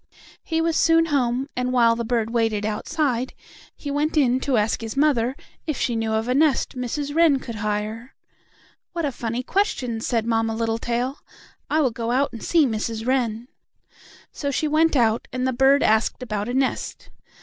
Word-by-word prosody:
He 325 0 -1
was 330 -1 +1
soon 330 0 +4
home, 255 0 +1
and, 250 0 -1
while 235 -2 +4
the 235 - -3
bird 230 -1 -1
waited 225 -3 0
outside, 255 +3 -1 0.4
he 285 - -6
went 300 +2 0
in 255 -3 +3
to 260 -2 0
ask 215 +2 0
his 225 +3 -6
mother 265 -4 +2 0.3
if 305 - -1
she 240 - 0
knew 225 -1 -1
of 220 +1 0
a 250 - +1
nest 290 0 +2
Mrs. 280 +4 -3
Wren 325 -4 +5
could 235 -4 -7
hire. 215 +3 -3 0.8
"What 335 -2 -1
a 285 - -1
funny 235 0 -3
question!" 260 - -1
said 230 -1 0
Mamma 225 -1 0
Littletail. 235 +3 -1 0.5
"I 315 - +2
will 260 -4 +2
go 230 0 -4
out 260 +2 +1
and 230 - -8
see 330 -4 +3
Mrs. 225 -1 -3
Wren." 240 -3 0 0.8
So 285 - -3
she 305 +3 0
went 315 +1 +3
out, 230 -3 +2
and 255 0 -2
the 260 - +1
bird 270 +3 +4
asked 220 +3 +2
about 210 -2 -3
a 245 - -2
nest. 265 0 -2
250 Hz, 185 wpm, -23 LUFS, 225-280 Hz, 0.8 s, Wren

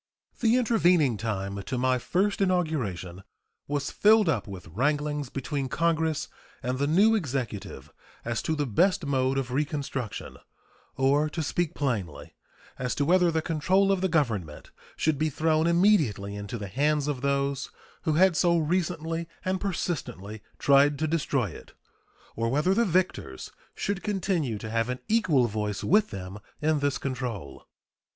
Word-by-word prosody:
The 235 +1 +3
intervening 180 - +3
time 100 -2 -3
to 125 +6 -4
my 130 0 +2
first 200 +10 0
inauguration 135 - -1 0.5
was 145 -1 -2
filled 215 -1 +5
up 130 -10 0
with 95 -4 -9
wranglings 145 - -1
between 135 0 -3
Congress 160 -1 0 0.4
and 125 +1 -2
the 140 - +1
new 200 +9 +5
Executive 130 - -3 0.3
as 115 0 -1
to 160 - -1
the 145 -1 -1
best 170 - +2
mode 135 -1 +1
of 130 -2 -2
"reconstruction," 140 -4 -3 0.6
or, 140 +3 +3
to 160 +1 -3
speak 170 +2 -1
plainly, 105 - -3 0.5
as 125 0 -2
to 145 - 0
whether 180 +2 +4
the 160 -1 0
control 185 +5 +2
of 195 -2 +1
the 190 - +2
Government 110 - -1 0.2
should 155 -3 0
be 155 0 +1
thrown 155 +2 +1
immediately 160 - +2
into 100 +2 -5
the 100 -2 -6
hands 145 +7 +1
of 140 -4 -2
those 140 -1 0 0.3
who 160 -3 0
had 180 +2 +4
so 170 +1 +3
recently 165 0 -1 0.2
and 185 0 -1
persistently 125 - -4 0.2
tried 140 +1 +4
to 155 - -1
destroy 140 - 0
it, - - -13 0.6
or 115 0 -1
whether 150 +9 +2
the 235 +4 +3
victors 175 - -1 0.2
should 200 -1 -2
continue 185 - -1
to 110 +1 -7
have 115 +1 0
an 125 - -2
equal 185 - +3
voice 105 -2 -3
with 210 +4 +3
them 95 +1 -7 0.2
in 155 0 +1
this 145 -1 0
control. 125 - -5
145 Hz, 155 wpm, -27 LUFS, 120-170 Hz, 0.6 s, filled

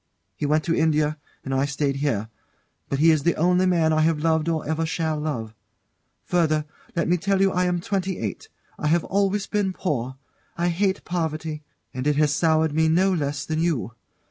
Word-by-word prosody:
He 150 - -2
went 155 +1 +2
to 165 - 0
India, 155 -1 +1 0.3
and 135 - -3
I 135 +1 +2
stayed 140 0 -1
here; 115 -7 -1 0.6
but 140 - 0
he 160 +3 +5
is 155 -2 +2
the 170 +3 +1
only 180 +3 +3
man 165 -3 +3
I 155 - +3
have 160 0 +2
loved 160 +1 +1
or 160 -3 -2
ever 160 +1 0
shall 160 -1 -1
love. 120 -8 -3 0.7
Further, 155 -4 +1 0.3
let 170 - 0
me 175 +1 +3
tell 195 +2 0
you 195 0 +4
I 180 0 +1
am 180 -1 0
twenty 190 0 -2
eight; 105 -3 -5 0.3
I 150 - -1
have 165 +2 +3
always 200 0 0
been 200 -2 -1
poor 130 - -2 0.4
I 175 +1 +1
hate 190 +3 0
poverty, 160 -3 -3 0.3
and 130 +2 -3
it 150 - +3
has 150 0 +3
soured 160 -1 +2
me 160 +1 +3
no 185 +4 +3
less 145 -3 -2
than 155 0 -2
you. 150 - 0
160 Hz, 195 wpm, -24 LUFS, 150-175 Hz, 0.7 s, he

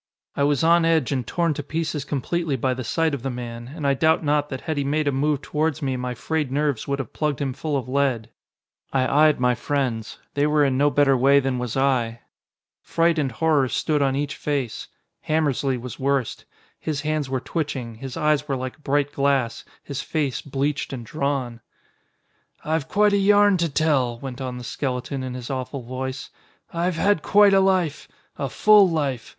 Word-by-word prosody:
I - - -2
was 145 0 +2
on 170 +1 +5
edge 160 -5 +2
and 130 -5 -2
torn 170 -2 0
to 145 - -4
pieces 155 0 -3
completely 155 +2 -1
by 130 +1 0
the 130 0 -5
sight 160 +6 0
of 140 - -3
the 135 - -3
man, 120 -1 -6
and 155 -4 -5
I 140 - +4
doubt 160 +4 +2
not 145 0 +1
that 130 -2 -5
had 160 - -3
he 140 - +1
made 150 +2 0
a - - +3
move 145 +1 0
towards 155 0 -1
me 135 -1 0
my 125 0 -3
frayed 150 +2 -2
nerves 145 -4 -1
would 140 0 0
have 135 -5 -6
plugged 150 -4 -1
him 135 -2 -2
full 150 +2 -2
of 130 - -4
lead. 130 -4 0 0.6
I 140 +3 +4
eyed 150 - +1
my 125 0 +3
friends. 120 -3 -2 0.2
They 145 +1 +2
were 150 -1 +3
in 135 -2 +1
no 145 +2 +3
better 140 0 +3
way 135 +3 +5
than 130 -2 -1
was 125 0 -3
I. 120 -4 +1 0.6
Fright 165 -1 +1
and 135 -3 0
horror 145 +3 +2
stood 150 +2 0
on 135 -1 +2
each 145 0 -2
face. 140 -6 -3 0.4
Hammersly 145 -4 +1
was 125 0 -8
worst. 135 -3 -1 0.3
His 150 -3 -3
hands 155 -2 -1
were 130 -1 -1
twitching, 135 -5 -4
his 125 +3 -8
eyes 150 -1 +1
were 140 - -1
like 130 +4 -6
bright 145 0 +1
glass, 135 -5 0 0.2
his 140 -3 -4
face 145 -7 -2
bleached 140 +1 -2
and 120 -3 -6
drawn. 135 -3 -2 1.0
"I've 160 -1 -1
quite 205 +3 +3
a - - +4
yarn 205 0 +5
to 170 -1 0
tell," 140 -5 +1
went 130 +1 -7
on 125 -1 -4
the 125 - -8
skeleton 130 +2 -3
in 130 -1 -5
his 125 +1 -6
awful 130 0 -4
voice. 130 +2 -5 0.4
"I've 170 +1 0
had 200 0 +2
quite 205 +2 +5
a 195 - +6
life. 185 -5 +1 0.3
A 140 - -2
full 210 +5 +6
life. 140 -8 -2
140 Hz, 200 wpm, -23 LUFS, 130-155 Hz, 1.0 s, a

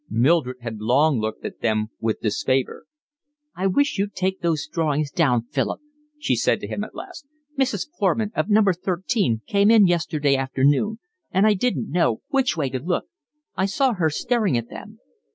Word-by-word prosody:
Mildred 130 +2 +2
had 110 -3 -6
long 135 +4 +3
looked 110 0 -4
at - - -7
them 110 -1 0
with 110 -1 -2
disfavour. 130 +4 -1 0.7
"I 190 +2 0
wish 285 +3 +1
you'd 200 0 -2
take 190 +1 -1
those 160 -4 0
drawings 150 -2 -1
down, 135 -10 +2
Philip," 135 -2 -1 0.4
she 300 - 0
said - - +1
to - - -5
him - - -3
at - - -10
last. 360 -7 -9 0.3
"Mrs. 265 -2 0
Foreman, 205 +2 +1
of - - -1
number 205 -2 +4
thirteen, 180 - -1
came 200 +1 +3
in 220 -3 +7
yesterday 155 -5 +1
afternoon, 135 +10 +1 0.3
and 190 +3 +2
I 215 - +5
didn't 230 +2 -1
know 165 -11 +1
which 265 -9 +1
way 140 -5 -1
to 130 - -2
look. 175 +7 -2 0.5
I 190 0 +1
saw 260 +5 +1
her 170 -6 +1
staring 210 - 0
at 115 0 -4
them." - - -10
170 Hz, 175 wpm, -23 LUFS, 130-205 Hz, 0.7 s, in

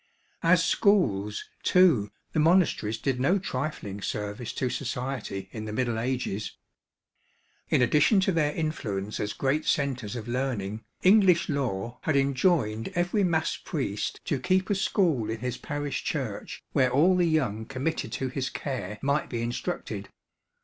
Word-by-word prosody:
As 170 0 +4
schools, 105 - +2
too, 160 - +4 0.2
the - - +1
monasteries 155 - +3
did 130 +1 -1
no 175 +10 +3
trifling 130 - -4
service 105 +4 -4
to 130 - -1
society 125 -6 -4
in 110 -1 -6
the 110 - -5
Middle 115 0 -1
Ages. 120 -4 -2 1.1
In 125 - +4
addition 150 - +4
to 190 - +2
their 155 -4 +2
influence 110 -11 -3
as 105 0 -2
great 140 +3 0
centres 125 -7 0
of 115 -2 -6
learning, 120 -5 -2 0.2
English 185 -3 +5
law 120 -6 -2
had 155 - 0
enjoined 135 - +2
every 175 +4 +1
mass 165 -3 +1
priest 130 - -3
to 145 - 0
keep 185 +6 +1
a - - +5
school 170 - +1
in 110 0 -4
his 125 -1 -2
parish 145 -2 -3
church - - -4
where 130 -1 +3
all 155 +9 +4
the 175 -1 +3
young 115 -9 0
committed 135 +5 -2
to 130 - -2
his 130 0 -2
care 105 -8 -4
might 140 +2 +1
be 115 -2 -2
instructed. 115 - -4
130 Hz, 150 wpm, -27 LUFS, 110-165 Hz, 1.1 s, English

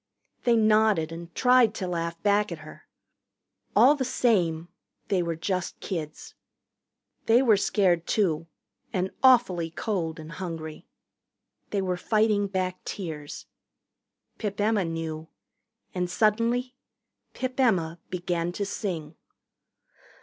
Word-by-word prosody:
They 240 -1 +5
nodded 215 -7 +3
and 170 +1 -8
tried 250 -3 +4
to 185 - -3
laugh 170 -1 -3
back 205 +1 +2
at - - -4
her. - - -13 0.9
All 270 +4 +7
the 285 -3 -2
same 180 -10 +1 0.4
they 190 -3 +2
were 170 -1 -2
just 185 +2 -3
kids. 155 -5 -6 0.9
They 235 +3 +5
were 225 -5 +5
scared, 185 -4 +1
too, 165 -6 +1 0.4
and 190 -3 -1
awfully 230 -11 +4
cold 165 -3 -3
and 155 +1 -9
hungry. 165 -3 -6 0.8
They 200 -2 -1
were 180 -1 -1
fighting 210 +1 +2
back 185 -1 -3
tears. 155 -6 -6 0.9
Pip 205 -2 -3
Emma 210 -2 +2
knew. 165 -1 -4 0.7
And 180 -1 -1
suddenly 230 +5 +1 0.6
Pip 255 0 -4
Emma 175 -10 +2
began 175 -1 -2
to 200 - -2
sing. 175 -6 -4
185 Hz, 120 wpm, -27 LUFS, 165-215 Hz, 0.9 s, All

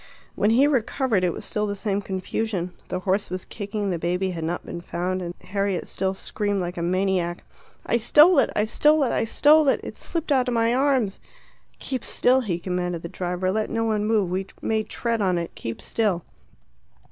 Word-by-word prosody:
When 205 - +2
he 245 +5 +5
recovered 260 -6 +1
it 180 - +2
was - - -7
still 210 0 -1
the 200 - -2
same 200 0 -1
confusion. 190 -1 -3
The 185 - -3
horse 195 +1 0
was 185 0 -5
kicking, 205 -1 -3
the 175 - -2
baby 180 +3 0
had 165 -2 -5
not 170 +2 -3
been 170 - -6
found, 185 +2 -2
and 175 0 -5
Harriet 195 -1 -2
still 190 0 -2
screamed 205 +1 -2
like 175 -1 -3
a 170 - -4
maniac, 180 -1 0 0.4
"I - - +2
stole 300 +8 +6
it! - - +3
I 210 - +2
stole 300 +7 +3
it! 255 - +1
I - - +1
stole 295 +6 +5
it! 270 - +3
It - - -7
slipped 330 -2 -4
out 255 -2 +3
of 245 - 0
my 230 +1 +2
arms!" 260 -6 +1 0.6
"Keep 260 -3 -4
still!" 255 +1 +3
he 190 -8 -2
commanded 180 -1 -3
the 170 - -5
driver. 180 +1 -2
"Let 215 +2 -1
no 225 0 -1
one 215 -2 0
move. 210 -5 +1
We 190 +1 -2
may 220 -1 0
tread 230 +1 -2
on 185 -3 +2
it. 170 -1 -4
Keep 115 - -6
still." 200 -7 0
200 Hz, 205 wpm, -24 LUFS, 180-230 Hz, 0.6 s, stole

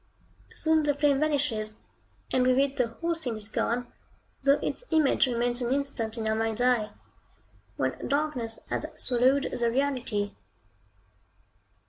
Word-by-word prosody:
Soon 315 0 +2
the 295 -2 +1
flame 285 -1 +3
vanishes, 275 -8 0 0.6
and 255 - +3
with 255 0 +4
it 275 0 +2
the 250 - +1
whole 335 +9 -2
scene 270 -9 -4
is 210 -1 -3
gone, 235 +2 -1 0.6
though 280 +1 +4
its - - -2
image 310 -4 +3
remains 240 0 0
an 240 0 -1
instant 265 -5 -1
in 225 - -3
your 220 - +1
mind's 225 0 -1
eye, 245 -4 +2 0.9
when - - -2
darkness 280 -6 0
has - - -1
swallowed 260 +3 +2
the 235 -1 +1
reality. 235 -6 -1
250 Hz, 140 wpm, -28 LUFS, 230-280 Hz, 0.9 s, with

